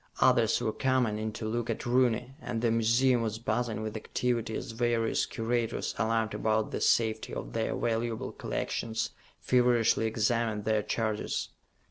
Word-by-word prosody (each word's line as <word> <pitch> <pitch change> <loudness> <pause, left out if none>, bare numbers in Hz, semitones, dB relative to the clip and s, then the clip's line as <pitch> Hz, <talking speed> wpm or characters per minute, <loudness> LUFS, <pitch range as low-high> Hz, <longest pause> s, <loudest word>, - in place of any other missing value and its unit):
Others - - +4
were 110 - 0
coming 130 -5 +1
in 110 0 -2
to 110 - -5
look 120 +2 -2
at 115 - -3
Rooney, 125 0 +2
and 115 -1 -3
the 115 - +3
museum 120 +2 +3
was 110 -1 -2
buzzing 115 -1 -1
with 110 0 -4
activity 115 0 -1
as - - -4
various 115 -1 +1
curators, 115 0 -1
alarmed 110 0 +1
about 110 0 0
the - - -3
safety 110 -2 +1
of - - -6
their - - -1
valuable 115 0 -1
collections, 110 0 -3 0.3
feverishly 120 -3 +3
examined 110 -1 0
their 110 -1 +2
charges. 110 0 -2
115 Hz, 150 wpm, -30 LUFS, 110-120 Hz, 0.3 s, Others